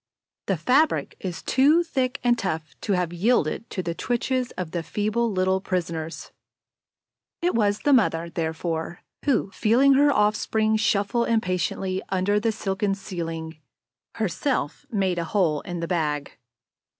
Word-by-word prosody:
The 195 Hz, -, +1 dB
fabric 270 Hz, -, +2 dB
is 180 Hz, -3 st, -5 dB
too 295 Hz, +6 st, +4 dB
thick 265 Hz, -5 st, -1 dB
and 240 Hz, -1 st, +4 dB
tough 160 Hz, -8 st, -3 dB
to 205 Hz, -, 0 dB
have 180 Hz, -2 st, 0 dB
yielded 210 Hz, +1 st, +1 dB
to 185 Hz, -, -3 dB
the 170 Hz, 0 st, -2 dB
twitches 250 Hz, +5 st, -1 dB
of 180 Hz, -3 st, -4 dB
the 170 Hz, -, -2 dB
feeble 215 Hz, +6 st, -1 dB
little 190 Hz, 0 st, +1 dB
prisoners. 170 Hz, -4 st, -3 dB, 1.1 s
It 355 Hz, -, +2 dB
was 205 Hz, -2 st, +1 dB
the 290 Hz, -, +3 dB
mother, 170 Hz, -9 st, +3 dB
therefore, 165 Hz, 0 st, -3 dB, 0.2 s
who, 245 Hz, -8 st, +1 dB
feeling 255 Hz, +8 st, +4 dB
her 285 Hz, +2 st, +5 dB
offspring 215 Hz, -1 st, +2 dB
shuffle 215 Hz, +2 st, +1 dB
impatiently 185 Hz, -3 st, 0 dB
under 195 Hz, +2 st, +1 dB
the 225 Hz, +1 st, +1 dB
silken 195 Hz, -2 st, -1 dB
ceiling, 165 Hz, -5 st, -6 dB, 0.6 s
herself 220 Hz, -, -2 dB
made 190 Hz, -5 st, 0 dB
a -, -, -1 dB
hole 165 Hz, -5 st, +1 dB
in 175 Hz, -1 st, -5 dB
the 170 Hz, -, -2 dB
bag. 150 Hz, -5 st, -1 dB
195 Hz, 140 wpm, -25 LUFS, 170-230 Hz, 1.1 s, her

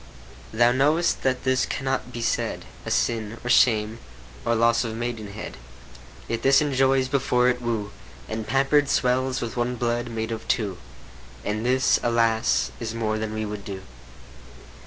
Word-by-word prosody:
Thou 120 Hz, +2 st, +4 dB
know'st 150 Hz, +7 st, +2 dB
that 130 Hz, -1 st, 0 dB
this 130 Hz, 0 st, +2 dB
cannot 135 Hz, -2 st, -2 dB
be 120 Hz, -1 st, -5 dB
said -, -, -1 dB, 0.2 s
A -, -, -1 dB
sin, 115 Hz, -1 st, 0 dB
nor 125 Hz, -, 0 dB
shame, 110 Hz, -2 st, +3 dB, 0.4 s
nor 115 Hz, -, +1 dB
loss 115 Hz, +2 st, +3 dB
of 115 Hz, -2 st, -4 dB
maidenhead; 110 Hz, -3 st, -5 dB, 0.7 s
Yet 115 Hz, 0 st, -2 dB
this 135 Hz, 0 st, +5 dB
enjoys 135 Hz, -2 st, +2 dB
before 125 Hz, -2 st, +2 dB
it 125 Hz, 0 st, -1 dB
woo, 110 Hz, -4 st, -2 dB, 0.4 s
And 110 Hz, 0 st, -4 dB
pamper'd 135 Hz, +4 st, +3 dB
swells 130 Hz, 0 st, +1 dB
with 115 Hz, -, -4 dB
one 120 Hz, +1 st, 0 dB
blood 120 Hz, 0 st, -1 dB
made 110 Hz, 0 st, -3 dB
of 115 Hz, -, -5 dB
two; 100 Hz, -6 st, -1 dB, 0.7 s
And 105 Hz, +1 st, -2 dB
this, 130 Hz, +1 st, +3 dB
alas! 115 Hz, -, +2 dB
is 110 Hz, 0 st, -4 dB
more 110 Hz, -1 st, -1 dB
than 110 Hz, 0 st, -3 dB
we 110 Hz, 0 st, -2 dB
would 105 Hz, -1 st, -6 dB
do. 95 Hz, -2 st, -7 dB
120 Hz, 155 wpm, -24 LUFS, 110-130 Hz, 0.7 s, this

